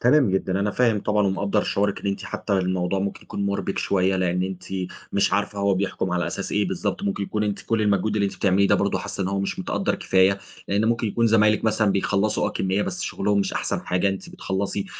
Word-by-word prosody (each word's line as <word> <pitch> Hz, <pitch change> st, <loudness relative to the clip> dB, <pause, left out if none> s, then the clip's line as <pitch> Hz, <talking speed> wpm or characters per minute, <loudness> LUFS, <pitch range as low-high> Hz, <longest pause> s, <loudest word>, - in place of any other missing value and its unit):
تمام 125 Hz, -3 st, +4 dB
جدًا. 95 Hz, 0 st, 0 dB
أنا 105 Hz, +1 st, +1 dB
فاهم 115 Hz, -3 st, +2 dB
طبعًا، 105 Hz, -1 st, +1 dB
ومقدّر 100 Hz, +1 st, +1 dB
شعورِِك 100 Hz, 0 st, 0 dB
إن -, -, -5 dB
أنتِ 100 Hz, -, -2 dB
حتّى -, -, -4 dB
الموضوع 95 Hz, 0 st, 0 dB
ممكن 100 Hz, +1 st, -3 dB
يكون 100 Hz, 0 st, -4 dB
مُربِك 100 Hz, 0 st, -2 dB
شويّة، 95 Hz, -1 st, +1 dB
لإن 90 Hz, 0 st, 0 dB
أنتِ 95 Hz, -1 st, -5 dB, 0.5 s
مش -, -, +2 dB
عارفة 100 Hz, -, 0 dB
هو 100 Hz, -1 st, +2 dB
بيحكُم 95 Hz, -1 st, -2 dB
على 90 Hz, -1 st, 0 dB
أساس -, -, -4 dB
إيه -, -, +1 dB
بالضبط. -, -, -2 dB
ممكن 100 Hz, 0 st, -1 dB
يكون 105 Hz, +1 st, -1 dB
أنتِ 105 Hz, -1 st, -2 dB
كل 115 Hz, -1 st, 0 dB
المجهود 105 Hz, +1 st, +1 dB
اللي 100 Hz, -, +2 dB
أنتِ -, -, -6 dB
بتعمليه 100 Hz, 0 st, +3 dB
ده -, -, +5 dB
برضه -, -, +1 dB
حاسّة 100 Hz, -, -4 dB
إن 95 Hz, -, -1 dB
هو 100 Hz, 0 st, -1 dB
مش 100 Hz, -, -3 dB
متقدّر -, -, -1 dB
كفاية، 95 Hz, +1 st, +3 dB, 0.3 s
لإنّ 100 Hz, +2 st, +1 dB
ممكن 115 Hz, 0 st, +1 dB
يكون 115 Hz, +3 st, +1 dB
زمايلِك 110 Hz, 0 st, +4 dB
مثلًا 110 Hz, -2 st, +2 dB
بيخلّصوا 100 Hz, +2 st, +1 dB
آه -, -, -1 dB
كمّية، 95 Hz, +2 st, 0 dB
بس 180 Hz, -, -4 dB
شغلهم 100 Hz, +1 st, 0 dB
مش -, -, -1 dB
أحسن -, -, -2 dB
حاجة. 90 Hz, +2 st, 0 dB
أنتِ 95 Hz, -1 st, -5 dB
بتخلّصي 100 Hz, +1 st, -3 dB
100 Hz, 225 wpm, -24 LUFS, 95-105 Hz, 0.5 s, ده